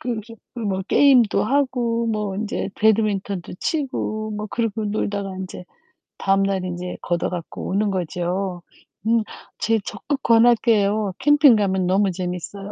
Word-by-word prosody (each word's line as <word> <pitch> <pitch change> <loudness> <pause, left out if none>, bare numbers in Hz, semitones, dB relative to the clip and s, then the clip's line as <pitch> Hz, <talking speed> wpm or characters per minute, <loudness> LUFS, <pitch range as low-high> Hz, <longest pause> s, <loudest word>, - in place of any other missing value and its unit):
그 235 -2 -3
깁 225 +1 -13 0.2
음 220 -3 -2
뭐 190 0 -1
게임도 255 -6 +5
하고 240 -3 0
뭐 210 -3 -2
인제 210 -1 -3
배드민턴도 205 -4 +1
치고 215 -8 -2
뭐 210 0 -4
그러고 225 -2 -2
놀다가 200 -2 -2
인제 185 -1 -7 0.5
다음날 195 -1 +1
인제 180 0 -5
걷어 175 -1 -1
갖고 175 -2 -6
오는 205 +2 +1
거죠. 180 0 -2 0.5
음 230 0 +4 0.4
제 225 0 +2
적극 285 -1 -4
권할게요. 220 -3 +3
캠핑 290 -2 +6
가면 190 -3 +1
너무 195 +1 +2
재밌어요. 185 +3 -5
210 Hz, 280 characters per minute, -22 LUFS, 190-230 Hz, 0.5 s, 캠핑